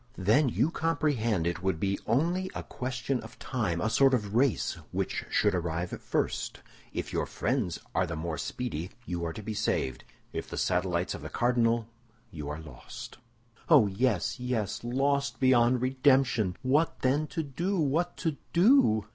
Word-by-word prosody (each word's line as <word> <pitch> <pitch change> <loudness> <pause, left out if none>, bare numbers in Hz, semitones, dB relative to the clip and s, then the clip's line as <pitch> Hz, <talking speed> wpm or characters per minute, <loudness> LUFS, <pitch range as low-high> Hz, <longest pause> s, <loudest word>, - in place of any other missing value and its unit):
"Then 115 +10 +3
you 155 - +1
comprehend 135 - 0
it 85 0 -1
would 95 -3 0
be 100 +1 0
only 170 +10 +1
a - - -4
question 130 +1 -3
of 110 +2 -12
time, 105 -10 -2
a 90 - 0
sort 135 +3 +4
of 105 -4 -3
race, 125 +1 +2 0.2
which - - -2
should 105 -2 +2
arrive 85 0 -2
first. - - -2 0.3
If - - -4
your - - 0
friends 85 - -1 0.2
are - - +1
the 85 - -4
more 80 -1 -3
speedy, 90 - -4 0.2
you 85 -5 -3
are 85 -1 -2
to 110 - -8
be 110 +1 -4
saved; 65 -9 -1 0.3
if - - -4
the - - -6
satellites 90 0 0
of - - -7
the - - -6
cardinal, 120 -2 +2 0.4
you 75 -5 -6
are 75 +1 -4
lost." 75 - -10 0.5
"Oh, 145 -9 +7
yes, 105 +2 0
yes; 125 -5 -2
lost 140 +3 0
beyond 125 -1 +4
redemption! 130 -7 +3
What, 145 +6 +2
then, 140 +4 +2
to 165 +1 -3
do? 175 +8 -2
What 160 +4 0
to 160 -4 -1 0.2
do?" 175 - +5
120 Hz, 165 wpm, -29 LUFS, 90-140 Hz, 0.5 s, Oh